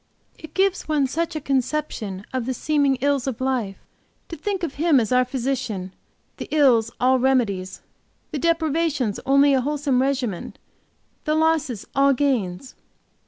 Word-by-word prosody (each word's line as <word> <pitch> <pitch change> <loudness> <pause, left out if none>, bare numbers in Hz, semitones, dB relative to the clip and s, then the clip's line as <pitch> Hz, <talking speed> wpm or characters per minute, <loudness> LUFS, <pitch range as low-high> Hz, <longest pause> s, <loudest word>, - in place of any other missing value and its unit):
It 315 -1 -12
gives 385 0 +1
one 300 -3 +2
such 325 +5 -2
a - - -1
conception 260 -8 -2
of 255 -2 -2
the 260 - -1
seeming 285 0 +1
ills 280 -2 +1
of 255 -5 -3
life; 250 -7 -1 0.5
to 335 - -5
think 380 +3 -3
of 315 -5 -2
Him 310 -2 +3
as 225 -1 -2
our 250 0 +4
Physician, 250 -7 -3 0.4
the - - -6
ills 260 -7 +4
all 255 +1 +3
remedies, 215 -8 0 0.5
the 295 - -3
deprivations 315 -7 0
only 275 +1 +5
a 265 - +3
wholesome 280 -2 0
regimen, 260 -8 -2 0.7
the 305 -1 +1
losses 315 -8 +1
all 275 0 +4
gains. 250 -5 -1
270 Hz, 150 wpm, -23 LUFS, 245-305 Hz, 0.7 s, only